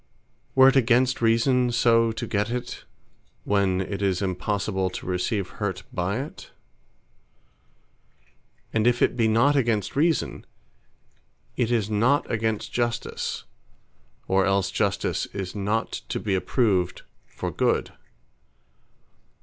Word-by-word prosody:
were 130 0 +8
it 135 - 0
against 125 0 +3
Reason 120 +2 +3
so 115 -1 +3
to 110 - -4
get 105 +1 -1
it, 125 0 -5 0.6
when 100 -2 +1
it 100 +1 -4
is 95 -2 +1
impossible 95 0 -1
to - - -8
receive 90 +2 -1
hurt 95 -3 -2
by 90 +4 -1
it? 150 - -11 2.2
and 110 +1 +2
if 120 0 +3
it - - +2
be 115 -2 +2
not 120 +7 +3
against 115 -7 0
Reason, 160 +2 0 1.1
it 120 -2 0
is 110 -4 +1
not 120 +7 +2
against 110 -2 -2
Justice; 120 -1 -2 0.8
or 95 0 +3
else 100 -1 +1
Justice - - -1
is 95 -2 -4
not 105 +2 -1 0.2
to - - -2
be 100 - -2
approved 95 -2 0 0.2
for - - -5
good. - - 0
110 Hz, 120 wpm, -25 LUFS, 95-120 Hz, 2.2 s, were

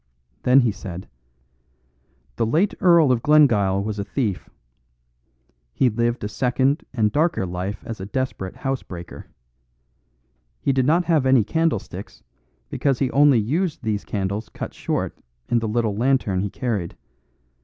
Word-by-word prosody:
Then 130 +2 +5
he 120 -3 +2
said, 95 -3 -8 1.3
"The - - +1
late 170 - +2
Earl 170 -7 +5
of 120 -2 +1
Glengyle 115 -10 +4
was 105 0 -4
a - - -1
thief. 105 -3 -3 1.3
He 130 -3 +3
lived 120 +1 -1
a - - -1
second 130 +6 0
and 110 -4 +1
darker 155 - +1
life 90 +3 -5
as 115 -3 -6
a 95 - -6
desperate 130 -6 -3
housebreaker. 95 -11 -6 1.3
He 140 - +1
did 130 -1 +1
not 170 +3 +3
have 155 -6 +2
any 130 -4 +5
candlesticks 160 -1 -2 0.5
because 135 -3 +1
he 135 -1 0
only 145 -2 +5
used 150 - -1
these 105 -2 -1
candles 100 +2 -3
cut - - -7
short - - -3 0.3
in 120 - +3
the 115 - -3
little 110 -1 0
lantern 120 -5 +1
he 100 - -2
carried. 105 -7 -3
120 Hz, 145 wpm, -22 LUFS, 105-135 Hz, 1.3 s, Then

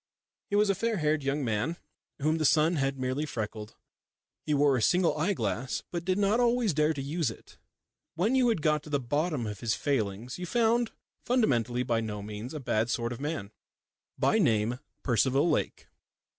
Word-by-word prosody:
He 205 - 0
was 205 0 +4
a - - +2
fair 225 +3 -1
haired 155 -2 +1
young 140 +1 -1
man 115 +10 -1 0.5
whom 155 +2 +2
the - - 0
sun 155 +3 +4
had 135 -1 0
merely 130 +3 -1
freckled. 110 -6 -5 0.7
He 150 - +2
wore 140 -1 +4
a 125 - 0
single 180 +8 +3
eye 170 +7 +1
glass, 115 - -2
but 175 -1 -3
did 185 0 +1
not 205 +3 +2
always 240 -5 +2
dare 150 +1 +2
to 145 -3 -3
use 150 0 -1
it. 110 - -13 0.6
When 195 +9 +1
you 255 -2 +4
had 185 -10 0
got 150 -1 +2
to 150 - -12
the 145 -1 +1
bottom 145 +1 -1
of 105 -2 -5
his 115 -3 0
failings 120 - -2
you 180 - -4
found 235 +2 +2 0.3
fundamentally 125 - +1
by 115 -2 0
no 105 -2 -5
means 105 +7 -7
a - - -3
bad 115 -3 0
sort 120 0 -1
of 120 - -9
man, 145 -9 -3 0.7
by 220 - +3
name 115 - +2 0.2
Percival 130 +5 +2
Lake. - - -1
145 Hz, 190 wpm, -29 LUFS, 120-175 Hz, 0.7 s, was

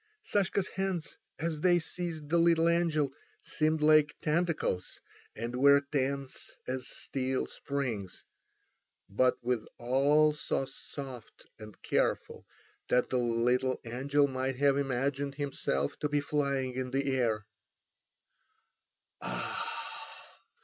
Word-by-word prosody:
Sashka's 200 - +1
hands 190 -4 -3 0.2
as 160 -1 -2
they 175 0 +5
seized 165 -2 -4
the 170 +2 +3
little 165 -1 +5
angel 160 -5 +2 0.3
seemed 155 0 0
like 155 -1 +5
tentacles, 155 - 0 0.4
and 120 +2 -4
were 140 +2 +6
tense 140 -1 -2
as 130 0 -3
steel 130 -1 -2
springs, 120 -10 -4 0.8
but 125 +7 +2
withal 135 +5 +2
so 150 -2 -1
soft 135 -2 -9
and 110 -1 -11
careful - - 0 0.4
that 125 - +2
the 125 - +2
little 125 +2 +1
angel 140 +5 +2
might 130 0 -2
have 140 +1 +3
imagined 140 +1 -1
himself 135 - -1
to 150 - -1
be 145 0 +2
flying 140 -3 -1
in 130 0 -3
the 135 +1 0
air. 110 -5 0
140 Hz, 110 wpm, -31 LUFS, 125-155 Hz, 0.8 s, were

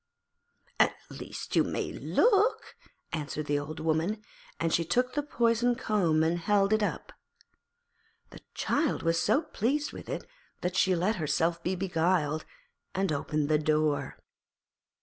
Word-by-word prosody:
'At - - +4 0.2
least - - -6
you - - +5
may - - -3
look,' 440 0 +2 0.4
answered 155 -1 -3
the 145 0 +1
Old 150 +2 -6
Woman, 165 +7 0 0.4
and 165 -1 0
she 170 - +3
took 250 +8 +1
the 295 - 0
poisoned 240 -3 +1
comb 175 -10 +2
and 165 +2 +1
held 200 +3 +2
it 215 - +3
up. 205 - -3 1.2
The - - -12
child 295 -1 0
was 165 0 +2
so 270 +10 +2
pleased 290 +2 -1
with - - -9
it - - -4 0.4
that 180 +1 -2
she 190 -1 +3
let 185 +5 +1
herself 165 +2 0
be 180 +2 -1
beguiled, 170 -4 0 0.5
and 190 -2 +1
opened 150 0 -1
the 155 0 +3
door. 150 -2 0
175 Hz, 145 wpm, -29 LUFS, 155-220 Hz, 1.2 s, you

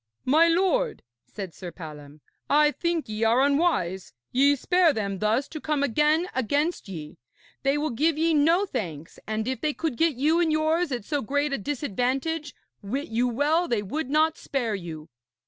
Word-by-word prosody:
'My 315 +6 +5
lord,' 385 +8 +1 0.2
said 195 -5 -7
Sir 180 -2 -8
Palom, 150 -3 -11 0.3
'I 300 +1 +5
think 340 0 -2
ye 215 +1 -3
are 235 +4 +4
unwise. 280 - +1 0.2
Ye 280 +3 +4
spare 350 +3 +3
them 200 -4 -3
thus 220 +6 +1
to 310 - -7
come 300 -2 0
again 300 +6 +2
against 285 - -1
ye. 155 -5 -8 0.4
They 275 +1 +1
will 300 0 -1
give 305 +6 +1
ye 325 +1 +2
no 330 +6 +3
thanks, 170 - -6
and 220 +1 -2
if 260 -3 -3
they 300 -1 -1
could 315 -7 -2
get 325 -3 +2
you 305 +6 +2
and 335 -2 +2
yours 315 +1 +1
at 240 -5 -3
so 290 +2 -1
great 285 +4 -1
a - - -1
disadvantage, 285 +5 -2 0.3
wit 255 +8 -4
you 235 +2 +1
well 295 +8 +1
they 225 -8 0
would 270 +7 -4
not 310 +2 +2
spare 245 -6 -2
you.' 165 -5 -6
280 Hz, 180 wpm, -26 LUFS, 220-315 Hz, 0.4 s, My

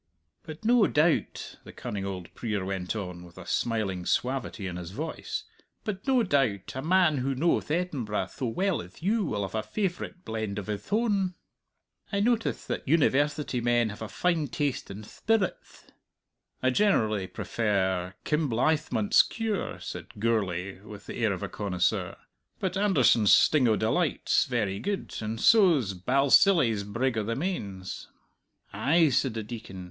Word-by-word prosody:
"But 155 +7 -10
no 235 -2 +5
doubt," 155 +2 0
the - - -11
cunning 100 -1 -5
old 90 -3 -6
prier 105 -5 -3
went 95 0 -3
on, 90 -4 -5
with 85 0 -15
a 95 - -9
smiling 100 -5 -1
suavity 125 -5 -1
in 90 -2 -4
his 90 -2 -6
voice 165 - -5 0.4
"but 200 -1 -5
no 260 -3 +4
doubt 135 - +1
a 130 - -4
man 165 -2 +3
who 135 +2 -1
knowth 165 +4 +1
Edinburgh 145 -11 -1
tho 130 - -2
well 185 - 0
as 90 - -14
you 215 +3 +2
will 105 - -2
have 95 - -5
a 110 - 0
favourite 185 - -4
blend 110 -2 -3
of 105 - -4
hith 105 - -5
own. 200 -5 +1 0.8
I 200 - 0
notice 225 +1 0
that - - -4
University 145 -3 +2
men 120 -1 +2
have 105 - -9
a 110 - -4
fine 170 -4 0
taste 145 -1 -2
in 100 +2 -8
thpirits." 215 - -2 0.8
"I 130 - +4
generally 110 - +2
prefer 95 -5 -1
'Kinblythmont's 155 - +2
Cure,'" 220 -4 -3
said - - -7
Gourlay, 100 -4 -1
with 105 0 -11
the - - -7
air 115 -3 +1
of 95 +1 -4
a - - -2
connoisseur. 90 -3 -1 0.4
"But 190 -1 -2
'Anderson's 135 - +4
Sting 145 -5 +5
o' 110 - +4
Delight' 140 +10 0
's - - +4
very 110 -7 -1
good, 200 0 -3
and 110 +1 -4
so's 175 - +5
'Balsillie's 130 - +4
Brig 115 +3 -1
o' - - -1
the 115 +2 -2
Mains.'" 100 - -4 0.7
"Ay," 160 +2 +3
said 130 -2 +1
the 110 - -3
Deacon. 110 -4 -8
125 Hz, 160 wpm, -28 LUFS, -, 0.8 s, no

